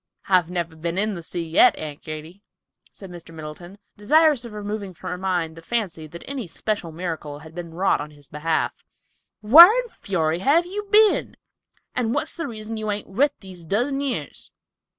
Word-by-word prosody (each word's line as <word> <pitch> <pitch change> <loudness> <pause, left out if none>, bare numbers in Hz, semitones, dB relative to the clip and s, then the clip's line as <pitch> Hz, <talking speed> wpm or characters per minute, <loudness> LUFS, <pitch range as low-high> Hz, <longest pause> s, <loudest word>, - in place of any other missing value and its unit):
"I've 180 -3 +3
never 170 -2 -3
been 170 +2 -3
in 210 +2 +1
the 175 - -6
sea 170 0 -5
yet, 160 - +5
Aunt 150 -2 -7
Katy," 155 +5 -8 0.5
said 195 -3 -12
Mr. 170 -1 -11
Middleton, 160 +5 -9 0.2
desirous 295 +5 +4
of 235 - -8
removing 205 -2 -5
from 185 - -7
her 180 - -3
mind 175 -4 -1
the 165 - -11
fancy 175 -6 -3
that 170 +3 -11
any 265 -7 -5
special 175 0 -3
miracle 160 -3 -5
had 160 +2 -13
been 170 -1 -7
wrought 190 -3 +2
in 150 - -7
his 145 -2 -17
behalf. 160 +2 -1 0.7
"Whar 305 +12 +11
in - - -1
fury 165 - -1
have 300 - +3
you 410 +3 -5
been, 430 0 +4 0.6
and 240 0 -1
what's 305 +2 -2
the 335 -3 -4
reason 220 -2 -6
you 215 -1 -3
hain't 205 0 -3
writ 280 +9 +1
these 185 -3 -11
dozen 245 - 0
years? 245 - -4
190 Hz, 185 wpm, -23 LUFS, 165-235 Hz, 0.7 s, Whar